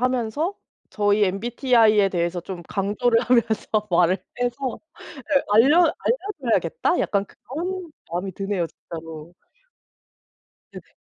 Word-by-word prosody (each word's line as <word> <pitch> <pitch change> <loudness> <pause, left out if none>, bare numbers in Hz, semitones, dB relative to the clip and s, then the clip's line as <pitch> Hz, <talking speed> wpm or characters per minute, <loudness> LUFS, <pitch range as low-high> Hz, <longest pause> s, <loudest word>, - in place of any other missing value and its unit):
하면서 255 - 0 0.4
'저의 205 0 +2
MBTI에 220 0 +3
대해서 175 -1 -1
좀 175 0 -7
강조를 220 +4 +1
하면서 235 -2 +1 0.2
말을 180 +2 +3 0.2
해서 245 +1 -2 0.3
예 275 -1 0
알려 250 +10 +6 0.2
알려줘야겠다.' 395 - 0
약간 200 -1 0
그런 345 - -6 0.2
마음이 180 +3 -3
드네요 195 -3 -2
진짜로. 165 0 -10 1.4
네네. - - -13
220 Hz, 260 characters per minute, -23 LUFS, 190-260 Hz, 1.4 s, 알려